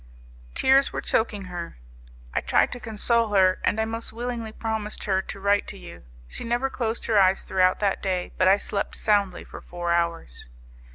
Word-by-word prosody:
"Tears 270 +1 +4
were - - -3
choking 210 -3 0
her. 175 - -7 0.6
I - - 0
tried - - +2
to 245 - -6
console 225 -1 0
her, 185 -1 +4
and 220 - +1
I 220 - +2
most 225 +1 -4
willingly 235 -1 -4
promised 220 -1 -4
her 190 -2 +1
to 195 - -8
write 200 +1 +2
to 200 - -7
you. 85 - -12 0.2
She - - -6
never 240 +3 -1
closed 230 -2 -2
her 220 -3 +3
eyes 190 0 +3
throughout 185 -1 +2
that 200 -2 +1
day, 185 -2 -2
but 185 - +4
I 195 +1 +6
slept 200 0 -3
soundly 200 -4 +1
for - - -11
four 175 -1 -4
hours. 170 - -2
205 Hz, 185 wpm, -25 LUFS, 185-225 Hz, 0.6 s, I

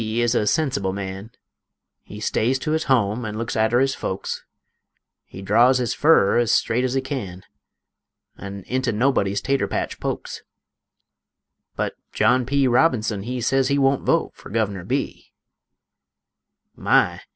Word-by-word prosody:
is 115 +2 0
a 105 -3 +1
sensible 115 -10 0
man; 95 +1 -6 0.7
He 105 - -11
stays 115 +4 0
to 145 +4 -3
his 160 0 0
home 120 -3 +1
an' 105 -1 -5
looks 115 0 -3
arter 110 +2 +2
his 135 0 +2
folks; 95 -5 -4 0.8
He 95 - -11
draws 120 +6 +4
his 125 -2 -1
furrer 145 -9 +4
ez 120 -3 +1
straight 120 +3 +1
ez 130 0 -1
he 135 - +1
can, 110 -10 -6 0.9
An' 100 0 -8
into 130 +2 -1
nobody's 105 -4 +1
tater 140 -1 0
patch - - -3
pokes; - - -4 1.3
But - - -2 0.2
John 125 -1 +2
P. 140 0 +2
Robinson 120 -5 +2
he 125 +4 -4
Sez 135 +2 +2
he 140 - +1
wunt 135 -1 +2
vote - - +1
fer - - -14
Guvener 100 -4 -2
B. - - -3 1.4
My! - - +2
120 Hz, 145 wpm, -22 LUFS, 105-130 Hz, 1.4 s, draws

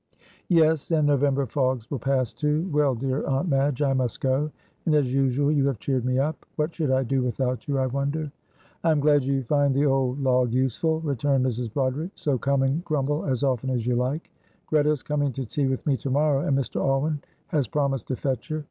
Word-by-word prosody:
'" - - -31
"Yes, 155 -2 +1
and 160 -3 +2
November 140 -1 +2
fogs 130 -2 -1
will 140 - -2
pass 130 -1 0
too. 150 +3 0
Well, 145 -3 +3
dear 130 +3 -2
Aunt 135 +5 0
Madge, 140 0 +1
I 135 -1 +2
must 130 -3 -1
go, 135 +3 +1 0.4
and 155 - +4
as 135 -4 +2
usual 135 +1 +2
you 140 -2 +2
have 135 -4 -1
cheered 130 +2 -1
me 130 0 +1
up. 145 +3 -1
What 155 +2 -1
should 155 -5 -1
I 130 0 +2
do 135 +2 0
without 125 +1 -2
you, 140 -1 0
I 130 - +1
wonder." 140 +3 -2 0.5
"I 165 - +3
am 155 -2 +3
glad 145 -1 +4
you 135 0 0
find 140 +1 +2
the 140 +2 +3
old 135 -1 +1
log 125 -3 +2
useful," 135 +6 0
returned 140 -3 +1
Mrs. 120 -2 -2
Broderick, 140 - -2
"so 140 -4 -1
come 140 +1 +1
and 140 +6 0
grumble 150 -2 -1
as 130 -1 -1
often 130 -1 0
as 120 -3 -1
you 125 - +1
like. 130 +6 -2 0.3
Greta 150 -1 +2
is 150 -4 0
coming 145 -2 0
to 130 +2 -4
tea 140 +4 -1
with 130 -1 -2
me 145 - +2
to 135 - -5
morrow, 145 +1 +2
and 135 - +2
Mr. 135 - -2
Alwyn 140 +2 0 0.3
has 145 -5 0
promised 135 -2 -1
to 130 - -1
fetch 130 +1 -3
her. 155 -1 -2
135 Hz, 220 wpm, -25 LUFS, 130-150 Hz, 0.5 s, and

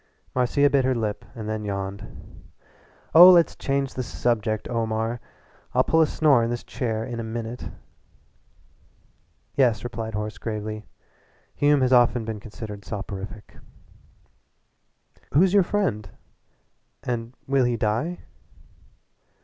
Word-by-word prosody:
Marcia 130 +3 +3
bit 140 -2 +2
her 130 0 +1
lip 105 -3 -2
and 110 -2 -6
then 110 0 -3
yawned. 100 -1 -6 0.7
"Oh, 175 +4 +11
let's 175 -2 +5
change 135 -1 -1
the 130 - -3
subject, 115 -3 -1
Omar. 115 0 -1 0.6
I'll - - +5
pull 160 - +3
a 160 - +4
snore 145 -7 +3
in 115 - -1
this 120 0 -3
chair 110 -3 -3
in 120 -2 -5
a - - -3
minute." 115 +1 -5 1.8
"Yes," 120 -6 +2
replied 115 -2 -5
Horace 105 -1 -4
gravely, 110 -1 -5 0.7
"Hume 145 -1 +3
has 130 0 +3
often 120 -1 +4
been 110 -1 -4
considered 105 -1 -9
soporific 100 0 -7 0.9
" - - -34
"Who's 180 +5 +5
your 200 - +6
friend 140 - -1 0.9
and 120 0 -4
will 135 -2 +2
he 120 -1 0
die?" 115 +11 -1
115 Hz, 125 wpm, -24 LUFS, 110-130 Hz, 1.8 s, Oh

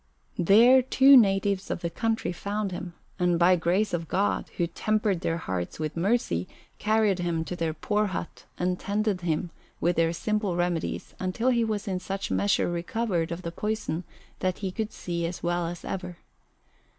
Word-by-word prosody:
There 230 +9 +7
two 265 +2 +6
natives 195 -4 +3
of - - -3
the 170 - -1
country 225 +1 -1
found 200 +2 -3
him, 175 -1 -6 0.2
and 175 -1 +2
by 180 +2 +5
grace 180 +5 +1
of 165 -1 -2
God, 195 +6 0
who 175 - +2
tempered 210 +1 0
their 165 - 0
hearts 95 - -4
with 155 -1 -3
mercy, 170 - 0 0.3
carried 215 -3 +2
him 170 -2 -1
to 180 - -4
their 165 -2 -2
poor 210 +6 0
hut 180 -3 -6
and 180 0 -1
tended 205 -2 -1
him 170 0 -1 0.3
with 175 +1 +1
their 165 0 +3
simple 210 +1 -1
remedies 175 -2 -2
until 185 +7 0
he 235 -2 +3
was 215 -2 -2
in 185 -2 -1
such 195 +1 -4
measure 200 0 +2
recovered 175 0 -1
of 170 +2 -5
the 170 - -4
poison 210 -3 -2 0.4
that 185 -1 -1
he 190 - -1
could 220 +2 -3
see 170 -1 -4
as 175 - -7
well 175 0 0
as 175 0 -7
ever. 180 -2 -5
185 Hz, 175 wpm, -27 LUFS, 170-210 Hz, 0.4 s, There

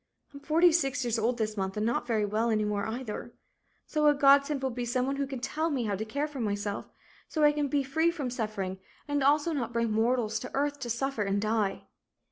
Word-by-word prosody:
I'm 280 - -9
forty 330 +4 +4
six 275 -5 +1
years 230 -1 0
old 235 +2 +1
this 215 -2 -1
month 190 0 -3
and 210 - 0
not 235 +1 0
very 220 -3 +1
well 215 +3 0
any 215 -1 +1
more, 205 0 -1
either. 240 0 -5 0.5
So 305 -1 +1
a 295 - +5
godsend 280 0 +4
will 265 - 0
be 245 +1 -4
some 250 +1 0
one 275 +1 -2
who 280 -1 -1
can 265 -2 -5
tell 305 +6 -1
me 270 -6 -1
how 210 -2 -1
to 205 - -3
care 285 +7 -2
for 295 -3 -8
myself, 205 -2 -2 0.4
so 310 - -1
I 295 - +7
can 295 -1 -1
be 280 0 +1
free 320 +5 +2
from 290 -7 -3
suffering 205 -5 -3 0.3
and 290 -1 0
also 295 +4 +3
not 240 -5 -3
bring 230 -1 0
mortals 225 0 +1
to 250 - -7
earth 285 +1 0
to 245 -3 -5
suffer 255 0 -1
and 200 0 0
die." 215 -1 0
250 Hz, 235 wpm, -29 LUFS, 220-285 Hz, 0.5 s, I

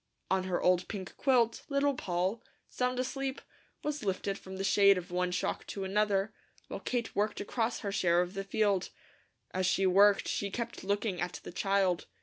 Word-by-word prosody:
On 190 -1 +2
her 180 -2 0
old 180 0 +2
pink 190 -4 -6
quilt 240 -4 +2
Little 280 0 +2
Poll, 185 0 -1 0.3
sound 250 0 -1
asleep, 265 +1 -2 0.4
was 295 -3 -2
lifted 195 0 -1
from 190 -1 -9
the 195 - -3
shade 200 0 +5
of 180 0 -6
one 180 0 0
shock 180 - -2
to 195 - -4
another, 200 +1 +1 0.4
while - - -5
Kate 240 -2 -3
worked 210 +1 0
across 230 +2 -1
her 200 - -3
share 175 -3 +3
of 180 +1 0
the 195 -1 -3
field. 195 -1 +1 0.6
As 185 -1 0
she 195 +1 +2
worked 200 +2 +5
she 200 - -1
kept 235 +4 -5
looking 200 -1 -1
at 175 - -3
the - - -8
child. 190 -1 +1
195 Hz, 180 wpm, -31 LUFS, 185-225 Hz, 0.6 s, shade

